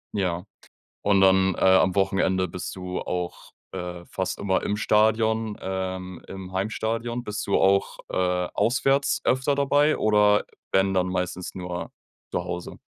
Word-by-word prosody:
Ja, 90 Hz, -3 st, -1 dB, 0.6 s
und 100 Hz, -1 st, +3 dB
dann, 95 Hz, 0 st, +4 dB
äh, -, -, -6 dB
am 95 Hz, 0 st, +5 dB
Wochenende 95 Hz, -1 st, +1 dB
bist 90 Hz, +2 st, -6 dB
du 90 Hz, -1 st, -4 dB
auch, 90 Hz, -1 st, -4 dB, 0.2 s
äh, 90 Hz, -1 st, -6 dB
fast 95 Hz, 0 st, -3 dB
immer 95 Hz, -2 st, 0 dB
im 105 Hz, 0 st, -1 dB
Stadion, 110 Hz, 0 st, +2 dB
ähm, 95 Hz, -1 st, -4 dB
im 95 Hz, -1 st, -8 dB
Heimstadion. 115 Hz, +4 st, -2 dB
Bist 105 Hz, -2 st, -4 dB
du 100 Hz, -, +2 dB
auch, 95 Hz, 0 st, +2 dB
äh, 90 Hz, -1 st, 0 dB
auswärts 135 Hz, +3 st, +2 dB
öfter 130 Hz, +2 st, +2 dB
dabei 145 Hz, +2 st, +3 dB
oder 105 Hz, -1 st, +4 dB, 0.3 s
wenn, 95 Hz, 0 st, +3 dB
dann 90 Hz, -1 st, +1 dB
meistens 90 Hz, 0 st, -3 dB
nur 90 Hz, -1 st, -5 dB, 0.4 s
zu -, -, -2 dB
Hause? 90 Hz, 0 st, -6 dB
95 Hz, 145 wpm, -25 LUFS, 90-110 Hz, 0.6 s, am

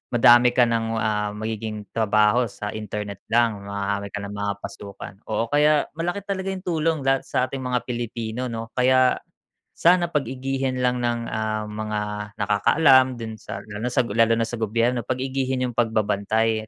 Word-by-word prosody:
madami 120 Hz, +1 st, +6 dB
ka 125 Hz, -, +6 dB
ng, 115 Hz, -1 st, 0 dB, 0.2 s
ah, 105 Hz, -1 st, 0 dB
magiging 110 Hz, -1 st, -5 dB
trabaho 110 Hz, +2 st, +3 dB
sa 105 Hz, +1 st, -6 dB
internet 105 Hz, -2 st, -5 dB
lang, 115 Hz, -3 st, +1 dB
marami 100 Hz, 0 st, -2 dB
ka 105 Hz, -, -3 dB
ng 100 Hz, -, -6 dB
mga 100 Hz, 0 st, -2 dB
pasukan. 100 Hz, 0 st, -8 dB
Oo, 115 Hz, +1 st, -1 dB
kaya 150 Hz, 0 st, +4 dB
malaki 175 Hz, +4 st, -2 dB
talaga 195 Hz, -1 st, -3 dB
'yung 190 Hz, -1 st, -6 dB
tulong 165 Hz, -3 st, 0 dB
lahat 135 Hz, 0 st, +2 dB
sa -, -, -3 dB
ating 135 Hz, +1 st, -5 dB
mga 125 Hz, -1 st, -1 dB
Pilipino 120 Hz, 0 st, -3 dB
'no, 115 Hz, 0 st, -5 dB
kaya, 130 Hz, 0 st, +4 dB, 0.6 s
sana 175 Hz, 0 st, +4 dB
pag-igihin 130 Hz, -1 st, -2 dB
lang 125 Hz, 0 st, +1 dB
ng, 120 Hz, -1 st, -1 dB
ah, 110 Hz, 0 st, -1 dB
mga 105 Hz, 0 st, -4 dB, 0.4 s
nakakaalam 130 Hz, +5 st, +4 dB
do'n 110 Hz, -2 st, -7 dB
sa 100 Hz, +1 st, -7 dB
lalo 105 Hz, +3 st, -5 dB, 0.2 s
lalo 115 Hz, +1 st, +4 dB
na 115 Hz, -, +1 dB
sa 115 Hz, 0 st, -4 dB
gobyerno 115 Hz, +3 st, 0 dB
pag-igihin 130 Hz, 0 st, -1 dB
'yung 125 Hz, -, -1 dB
pagbabantay, 110 Hz, -1 st, 0 dB
115 Hz, 160 wpm, -23 LUFS, 105-130 Hz, 0.6 s, madami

